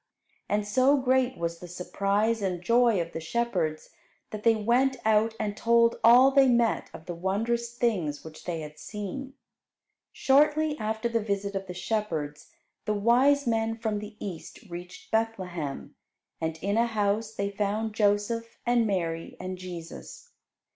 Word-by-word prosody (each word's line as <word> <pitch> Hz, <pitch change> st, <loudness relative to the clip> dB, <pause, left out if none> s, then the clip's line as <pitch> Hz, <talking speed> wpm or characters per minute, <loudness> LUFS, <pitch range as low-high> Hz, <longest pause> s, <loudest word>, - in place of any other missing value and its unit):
And 205 Hz, 0 st, +1 dB
so 260 Hz, +7 st, +4 dB
great 260 Hz, -1 st, +1 dB
was 170 Hz, 0 st, -3 dB
the 180 Hz, -, -9 dB
surprise 200 Hz, +5 st, 0 dB
and 180 Hz, -3 st, -2 dB
joy 235 Hz, 0 st, +4 dB
of 170 Hz, 0 st, -3 dB
the 165 Hz, -, -5 dB
shepherds 170 Hz, -4 st, -2 dB, 0.4 s
that 215 Hz, -, -5 dB
they 230 Hz, +1 st, +4 dB
went 245 Hz, +5 st, +2 dB
out 220 Hz, +1 st, +3 dB
and 205 Hz, -1 st, -2 dB
told 235 Hz, +1 st, +3 dB
all 250 Hz, +4 st, +8 dB
they 275 Hz, -1 st, +5 dB
met 240 Hz, -2 st, +2 dB
of 160 Hz, -, -11 dB
the 175 Hz, -, -4 dB
wondrous 230 Hz, +7 st, -2 dB
things 180 Hz, -12 st, 0 dB
which 160 Hz, -1 st, -11 dB
they 165 Hz, -2 st, -3 dB
had 150 Hz, 0 st, -9 dB
seen. 225 Hz, +6 st, -6 dB, 0.8 s
Shortly 300 Hz, +2 st, +3 dB
after 220 Hz, +2 st, -1 dB
the 230 Hz, -1 st, 0 dB
visit 200 Hz, -1 st, -2 dB
of 195 Hz, 0 st, -4 dB
the 180 Hz, -, -7 dB
shepherds, 165 Hz, -8 st, -3 dB, 0.4 s
the 210 Hz, -, 0 dB
wise 255 Hz, +7 st, +4 dB
men 225 Hz, -1 st, 0 dB
from 220 Hz, -2 st, -2 dB
the 210 Hz, +1 st, -9 dB
East 180 Hz, -6 st, -7 dB
reached 175 Hz, +1 st, -9 dB
Bethlehem, 185 Hz, -10 st, -2 dB, 0.5 s
and 160 Hz, 0 st, -2 dB
in 200 Hz, +2 st, 0 dB
a 235 Hz, +1 st, +3 dB
house 215 Hz, 0 st, -1 dB
they 200 Hz, 0 st, -2 dB
found 210 Hz, +2 st, -1 dB
Joseph, 215 Hz, +2 st, 0 dB
and 240 Hz, -2 st, +3 dB
Mary, 165 Hz, -4 st, -2 dB
and 185 Hz, 0 st, -4 dB
Jesus. 185 Hz, -, -9 dB
210 Hz, 155 wpm, -27 LUFS, 180-235 Hz, 0.8 s, all